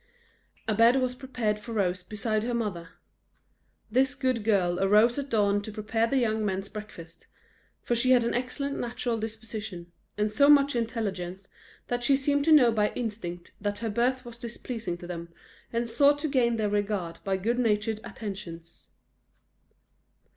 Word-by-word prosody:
A 220 Hz, -, +2 dB
bed 230 Hz, +4 st, +5 dB
was 255 Hz, -1 st, +1 dB
prepared 245 Hz, -5 st, -2 dB
for 230 Hz, +2 st, -8 dB
Rose 185 Hz, -4 st, 0 dB
beside 215 Hz, +2 st, -2 dB
her 240 Hz, +1 st, -1 dB
mother. 190 Hz, -8 st, -3 dB, 1.0 s
This 265 Hz, +3 st, +3 dB
good 255 Hz, -5 st, 0 dB
girl 185 Hz, -5 st, +2 dB
arose 210 Hz, +6 st, +4 dB
at 280 Hz, 0 st, -5 dB
dawn 205 Hz, -3 st, +2 dB
to 215 Hz, -, -7 dB
prepare 220 Hz, +2 st, 0 dB
the 270 Hz, -, +1 dB
young 220 Hz, -3 st, +1 dB
men's 195 Hz, -1 st, -2 dB
breakfast; 175 Hz, -6 st, -10 dB, 0.6 s
for -, -, 0 dB
she 240 Hz, +2 st, +2 dB
had 250 Hz, -2 st, +6 dB
an 235 Hz, -, 0 dB
excellent 270 Hz, +3 st, -2 dB
natural 240 Hz, -1 st, -2 dB
disposition, 215 Hz, -5 st, -6 dB, 0.3 s
and 210 Hz, 0 st, +1 dB
so 280 Hz, +7 st, +4 dB
much 285 Hz, -2 st, +6 dB
intelligence 195 Hz, -5 st, -3 dB, 0.4 s
that 245 Hz, 0 st, -2 dB
she 275 Hz, +3 st, +4 dB
seemed 285 Hz, +1 st, +1 dB
to 325 Hz, -, +4 dB
know 260 Hz, -6 st, +7 dB
by 210 Hz, -2 st, +2 dB
instinct 205 Hz, -7 st, -5 dB
that 205 Hz, 0 st, -2 dB
her 225 Hz, -1 st, -3 dB
birth 250 Hz, +3 st, 0 dB
was 235 Hz, -1 st, -9 dB
displeasing 235 Hz, -5 st, -5 dB
to 175 Hz, -, -10 dB
them, 170 Hz, -1 st, -6 dB, 0.4 s
and 235 Hz, 0 st, -1 dB
sought 280 Hz, +5 st, +4 dB
to 300 Hz, +2 st, -2 dB
gain 250 Hz, -5 st, +2 dB
their 215 Hz, -2 st, 0 dB
regard 200 Hz, -5 st, -2 dB
by 195 Hz, -1 st, 0 dB
good 230 Hz, +6 st, 0 dB
natured 215 Hz, -2 st, +1 dB
attentions. 195 Hz, -7 st, -8 dB
225 Hz, 165 wpm, -28 LUFS, 205-245 Hz, 1.0 s, know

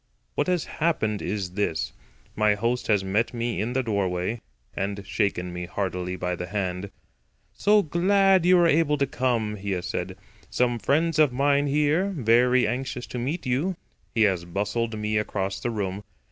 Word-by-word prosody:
What -, -, 0 dB
has 180 Hz, -3 st, +1 dB
happened 110 Hz, -11 st, -1 dB
is 100 Hz, -4 st, -3 dB
this: 80 Hz, -10 st, -1 dB, 0.4 s
My 105 Hz, -1 st, +3 dB
host 120 Hz, +4 st, -1 dB
has 105 Hz, -3 st, +3 dB
met 105 Hz, +6 st, 0 dB
me 115 Hz, -1 st, -1 dB
in 115 Hz, +3 st, -2 dB
the 130 Hz, 0 st, +1 dB
doorway, 100 Hz, 0 st, -1 dB, 0.3 s
and 100 Hz, 0 st, -3 dB
shaken 90 Hz, -5 st, -1 dB
me 90 Hz, 0 st, -5 dB
heartily 90 Hz, -1 st, -3 dB
by 90 Hz, 0 st, -2 dB
the 90 Hz, +1 st, -5 dB
hand. 95 Hz, 0 st, -3 dB, 0.6 s
"So 210 Hz, 0 st, +4 dB
glad 190 Hz, +3 st, +3 dB
you 180 Hz, +1 st, +6 dB
were 175 Hz, -, +5 dB
able 155 Hz, -2 st, +3 dB
to 140 Hz, -, +2 dB
come," 120 Hz, -5 st, -1 dB
he 100 Hz, 0 st, -3 dB
has 90 Hz, -1 st, -3 dB
said. 95 Hz, +1 st, -4 dB, 0.3 s
"Some 120 Hz, -1 st, +1 dB
friends 155 Hz, +7 st, +1 dB
of 150 Hz, -4 st, +5 dB
mine 140 Hz, +2 st, +2 dB
here, 150 Hz, +7 st, +1 dB
very 125 Hz, +1 st, +4 dB
anxious 125 Hz, 0 st, -3 dB
to 125 Hz, -, -6 dB
meet 145 Hz, +8 st, -3 dB
you." 140 Hz, +9 st, 0 dB, 0.4 s
He 115 Hz, -, +4 dB
has 95 Hz, -5 st, +2 dB
bustled 105 Hz, +5 st, -2 dB
me 105 Hz, 0 st, 0 dB
across 95 Hz, -2 st, -2 dB
the 120 Hz, -, -2 dB
room. 100 Hz, -3 st, -3 dB
115 Hz, 175 wpm, -25 LUFS, 100-140 Hz, 0.6 s, you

